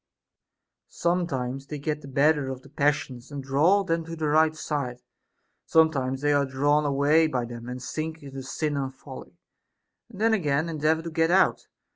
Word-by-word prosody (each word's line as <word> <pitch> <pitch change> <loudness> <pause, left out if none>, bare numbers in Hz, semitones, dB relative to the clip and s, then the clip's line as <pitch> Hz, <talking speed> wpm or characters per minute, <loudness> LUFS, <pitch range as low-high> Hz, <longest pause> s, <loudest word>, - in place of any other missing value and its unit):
Sometimes 135 -7 -2
they 150 - -5
get 150 +1 -3
the 140 - -11
better 140 0 +2
of 130 -1 -6
the 140 - -15
passions, 140 -3 -1
and 140 -2 -6
draw 155 +9 +3
them 165 -3 -1
to 165 0 -6
the 160 -1 -3
right 155 +1 +3
side; 140 -5 -4 0.6
some 160 -1 +5
times 130 -2 -2
they 145 0 +2
are 145 0 +3
drawn 145 +3 +1
away 145 +3 +3
by 125 -5 -2
them, 120 0 -8
and 125 +1 -5
sink 160 +4 -5
into 135 -1 -7
sin 145 +2 -2
and 135 -1 -3
folly, - - -11 0.7
and 210 -5 -12
then 225 +1 +3
again 155 -5 +1
endeavor 160 +1 +1
to 165 - -6
get 165 0 +2
out. 190 +2 +3
145 Hz, 180 wpm, -26 LUFS, 135-160 Hz, 0.7 s, some